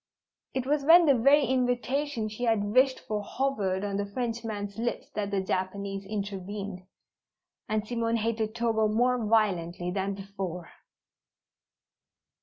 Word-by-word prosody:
It 260 -1 -1
was 290 +1 +1
when 335 +3 +8
the 285 - +6
very 275 +4 +5
invitation 255 0 0
she 215 +3 -4
had 205 -3 +1
wished 260 +1 +4
for 210 -1 -3
hovered 205 -6 -1
on 200 -1 -2
the 200 - -1
Frenchman's 225 -3 -4
lips 235 +1 -3
that 205 -1 -2
the 200 -1 0
Japanese 195 +1 -3
intervened, 200 -2 -5 0.8
and 215 0 -1
Simone 230 -1 0
hated 220 0 -1
Togo 225 -2 +2
more 245 +3 +2
violently 180 -5 +1
than 195 +1 -2
before. 195 -3 -6
215 Hz, 130 wpm, -28 LUFS, 200-245 Hz, 0.8 s, when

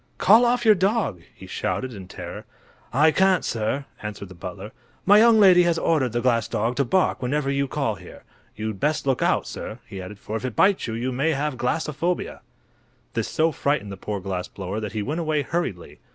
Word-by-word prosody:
"Call 220 +6 +6
off 240 0 +1
your 220 - +8
dog," 190 - 0
he - - -12
shouted, 130 -1 -3
in 95 -3 -9
terror. - - -8 0.5
"I 150 +6 +4
can't, 190 +1 +3
sir," 115 +5 -2 0.2
answered 105 -2 -6
the - - -10
butler. 85 - -8 0.3
"My 205 +2 +7
young 225 0 +6
lady 185 -3 +7
has 170 -1 +2
ordered 150 -7 +1
the 120 +1 -1
glass 115 -3 +2
dog 115 +4 -1
to 140 - +3
bark 185 +10 +1
whenever 135 +2 0
you 140 0 0
call 135 -5 -1
here. 95 -3 -13 0.3
You'd 110 -2 -4
better 150 +2 0
look 135 -2 +1
out, - - +2
sir," - - -6
he 95 - -8
added, 95 +3 -9
"for 105 +2 -6
if 115 - -8
it 125 -4 -4
bites 195 - +3
you, 110 - -3
you 125 +3 -2
may 140 +6 +1
have 145 0 -2
glassophobia!" 150 +6 -2 0.7
This - - -1
so 160 +1 +1
frightened 140 -9 -1
the - - -5
poor 100 +1 -4
glass 90 -1 -4
blower 95 +2 -5
that 105 -2 -5
he 110 -2 -2
went 150 +9 -3
away 155 -3 0
hurriedly. 145 - -4
135 Hz, 210 wpm, -24 LUFS, 105-165 Hz, 0.7 s, your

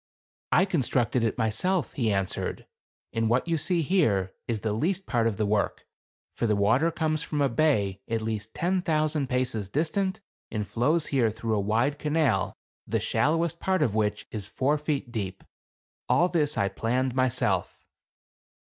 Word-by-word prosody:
" - - -
' - - -78
I 185 - +5
constructed 130 - +1
it 115 0 0
myself,' 130 - 0
he 115 -5 0
answered, 95 -2 -2 0.2
' - - -62
and 115 -1 +1
what 125 +7 +2
you 165 - +1
see 170 +2 +1
here 110 - +2
is 115 -3 -2
the 110 -2 -1
least 185 - -1
part 115 -3 +1
of 110 -4 -2
the 105 - +1
work, 105 0 0 0.5
for 115 - -1
the 105 - +2
water 115 +11 +3
comes 155 -2 -1
from 150 -2 -3
a 140 - +4
bay 110 -8 +1
at 115 -1 -1
least 110 0 -4
ten 185 +2 +1
thou 155 -2 +2
sand 150 -3 -1
paces 125 -6 -1
distant 185 - 0 0.3
and 105 -2 -2
flows 140 - +1
here 120 -5 +3
through 110 +1 -3
a - - +1
wide 115 +8 +1
canal, 150 -10 +1 0.3
the - - 0
shallowest 165 +2 +1
part 190 0 +1
of 110 - +1
which 105 -1 0
is 105 -3 -5
four 140 +6 0
feet 145 -4 -2
deep. 100 -5 -4 0.7
All 175 - +4
this 150 -6 0
I 100 -2 +2
planned 125 +5 -1
myself. 130 -1 0
125 Hz, 180 wpm, -27 LUFS, 110-155 Hz, 0.7 s, I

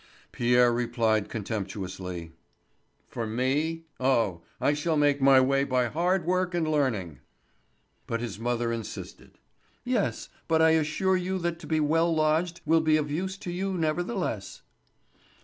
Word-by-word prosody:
Pierre 120 0 +3
replied 115 -3 0
contemptuously: 95 -5 -5 0.8
"For 115 -2 -4
me! 145 +8 -1
Oh, 115 -10 +1 0.2
I 145 - +2
shall 155 +2 0
make 145 -1 +2
my 135 0 +7
way 135 +1 +3
by 125 -3 +1
hard 175 +3 0
work 180 0 0
and 165 -2 0
learning." 115 - -1 0.9
But 115 - -2
his 115 -3 -5
mother 120 0 -1
insisted: 115 -2 -7 0.5
"Yes, 245 -4 -1 0.2
but 160 -1 +3
I 160 0 +5
assure 160 +4 +2
you 185 +1 -2
that 170 0 -2
to - - -10
be 160 -1 +1
well 165 +3 +2
lodged 160 +2 +1
will 165 0 +4
be 155 -1 +3
of 150 -1 -2
use 190 +5 -2
to 180 - -6
you 190 +2 -2
nevertheless." 165 - -2
145 Hz, 145 wpm, -27 LUFS, 115-165 Hz, 0.9 s, my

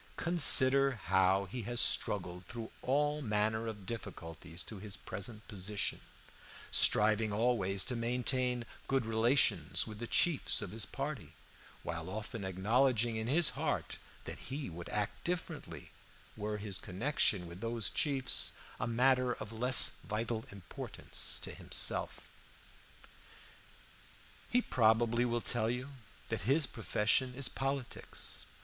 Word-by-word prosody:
Consider 140 -5 +5
how 95 -2 +2
he 120 +6 -6
has 120 -1 -2
struggled 90 -5 0
through 115 -1 -7
all 145 +3 +1
manner 110 -1 0
of 105 -3 -7
difficulties 90 -5 -6
to 105 - -9
his 100 -2 -5
present 105 +5 -7
position, 100 0 -3 0.7
striving 110 0 +4
always 105 -3 +1
to 125 - -1
maintain 125 +1 0 0.2
good 135 -3 +1
relations 115 +4 +3
with 110 -1 -8
the 120 - -5
chiefs 165 +2 +2
of 90 - -4
his 110 +2 -3
party, 140 +1 -5 0.5
while - - -4
often 110 +2 -5
acknowledging 115 +5 +2
in 110 +1 -3
his 155 +5 +4
heart - - -3 0.2
that - - -7
he 135 - -4
would 85 +1 -8
act 105 -1 -3
differently 175 -1 -5 0.4
were 105 0 -3
his 100 -2 -3
connection 105 -2 0
with 85 +2 -10
those 115 -1 -2
chiefs 135 -4 +1 0.3
a 110 - -1
matter 125 +1 +3
of 110 -1 -8
less 125 +3 +7
vital 110 +1 -3
importance 100 -3 -4
to - - -5
himself. - - -2 2.2
He 245 0 +3
probably 115 +1 +3
will 120 -1 -1
tell 115 -2 0
you 125 +3 -3 0.4
that 115 - -2
his 145 +2 +4
profession 120 +2 +1
is 135 -1 +1
politics. 135 -1 -4
115 Hz, 130 wpm, -33 LUFS, 105-130 Hz, 2.2 s, less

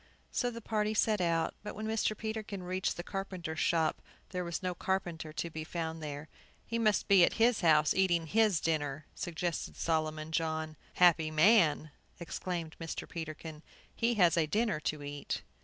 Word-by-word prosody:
So 245 - 0
the 230 -1 -7
party 215 0 0
set 210 -2 +2
out. 165 -2 +1
But 210 - -7
when 215 - -5
Mr. 220 -1 0
Peterkin 220 -3 -4
reached 185 +1 -1
the 175 - -4
carpenter's 185 -5 -5
shop, 165 -2 +1 0.3
there 180 -1 -3
was 170 +2 -4
no 180 -1 -1
carpenter 175 -4 -2
to 170 - -3
be 155 0 -5
found 160 0 -4
there. 150 0 -6 0.4
"He 230 - -2
must 215 -2 +2
be 195 -3 +7
at - - +4
his 230 0 +3
house, 155 -3 +5
eating 175 -3 +2
his 210 0 +3
dinner," 150 -2 -1
suggested 170 0 -3
Solomon 155 -1 -1
John. 160 -1 -1 0.2
"Happy 170 -3 +5
man," 155 -2 +4 0.3
exclaimed 170 -1 -4
Mr. 165 -1 -5
Peterkin, 155 -1 -7 0.3
"he 235 +1 +1
has 175 -5 +4
a 160 -2 +3
dinner 210 -2 +1
to 150 -1 -3
eat!" 145 0 -4
170 Hz, 170 wpm, -32 LUFS, 155-200 Hz, 0.4 s, be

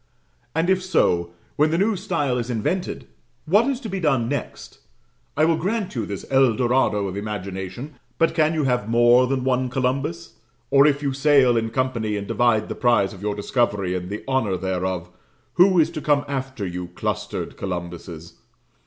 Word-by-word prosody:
And 165 +2 +1
if 190 0 +2
so, 85 - +1 0.3
when 150 +2 +4
the 165 - 0
new 205 +4 +2
style 165 -10 -1
is 120 +1 -4
invented, 150 - -2 0.4
what 205 - +3
is 270 -3 -1
to 230 - -5
be 195 -2 -3
done 135 -9 +1
next? 145 +3 -5 0.6
I 155 - +4
will 165 0 +2
grant 195 +4 -2
you 115 -5 -3
this 100 -1 -6
Eldorado 125 -5 +2
of 95 - -5
imagination 100 +6 -6 0.2
but 165 - +2
can 160 0 +2
you 155 - 0
have 125 -5 0
more 120 +2 +5
than 130 -1 -1
one 130 -1 0
Columbus? 135 +7 -2 0.3
Or, 140 +1 +6
if 145 0 +1
you 140 -1 0
sail 135 -3 +4
in 115 -1 0
company, 115 -4 -1
and 100 - -4
divide 115 -3 +2
the - - -4
prize 120 -6 +2
of 95 - -12
your 105 0 -2
discovery 105 -4 0
and 90 0 -4
the 105 +2 -5
honour 115 -8 0
thereof, 90 -1 -3 0.4
who 185 +1 +5
is 160 +1 +3
to 155 - -5
come 145 -1 +2
after 130 -5 -4
you 90 0 -5
clustered - - -3
Columbuses? 85 -2 -6
125 Hz, 180 wpm, -23 LUFS, 105-150 Hz, 0.6 s, Or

